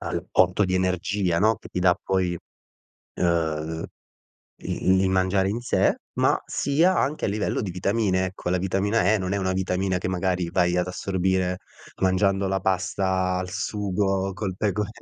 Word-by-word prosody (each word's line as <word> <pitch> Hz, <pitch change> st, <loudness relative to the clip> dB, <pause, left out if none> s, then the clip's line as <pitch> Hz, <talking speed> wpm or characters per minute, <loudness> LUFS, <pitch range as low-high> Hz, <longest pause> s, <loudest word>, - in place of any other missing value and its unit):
al -, -, -4 dB
porto 90 Hz, +2 st, +3 dB
di 95 Hz, 0 st, -1 dB
energia, 90 Hz, -1 st, 0 dB
no, 110 Hz, 0 st, +3 dB
che -, -, -13 dB
ti 90 Hz, -, -3 dB
dà 90 Hz, -1 st, +4 dB
poi 90 Hz, -3 st, 0 dB, 0.8 s
uhm, 80 Hz, -2 st, -1 dB, 0.7 s
il 95 Hz, 0 st, +1 dB
li 95 Hz, 0 st, +2 dB
mangiare 95 Hz, +1 st, +2 dB
in 115 Hz, +4 st, -3 dB
sé, 120 Hz, -, +2 dB, 0.2 s
ma -, -, +2 dB
sia 165 Hz, +6 st, +2 dB
anche 145 Hz, -2 st, 0 dB
a -, -, -1 dB
livello 105 Hz, +1 st, -1 dB
di 95 Hz, -, -3 dB
vitamine, 95 Hz, 0 st, 0 dB
ecco, 90 Hz, -1 st, -6 dB
la 90 Hz, -, +2 dB
vitamina 95 Hz, +4 st, +1 dB
E 110 Hz, -, +3 dB
non 95 Hz, -1 st, -3 dB
è -, -, 0 dB
una 95 Hz, -1 st, 0 dB
vitamina 95 Hz, 0 st, 0 dB
che 90 Hz, -, -3 dB
magari 90 Hz, -1 st, -1 dB
vai 90 Hz, -1 st, +2 dB
ad 90 Hz, -, 0 dB
assorbire 95 Hz, 0 st, -1 dB, 0.4 s
mangiando 95 Hz, +1 st, +2 dB
la 95 Hz, 0 st, 0 dB
pasta 95 Hz, 0 st, 0 dB
al 90 Hz, 0 st, -4 dB
sugo 95 Hz, -2 st, -1 dB
col 95 Hz, -1 st, -4 dB
pecor 105 Hz, 0 st, -1 dB
95 Hz, 170 wpm, -24 LUFS, 90-100 Hz, 0.8 s, dà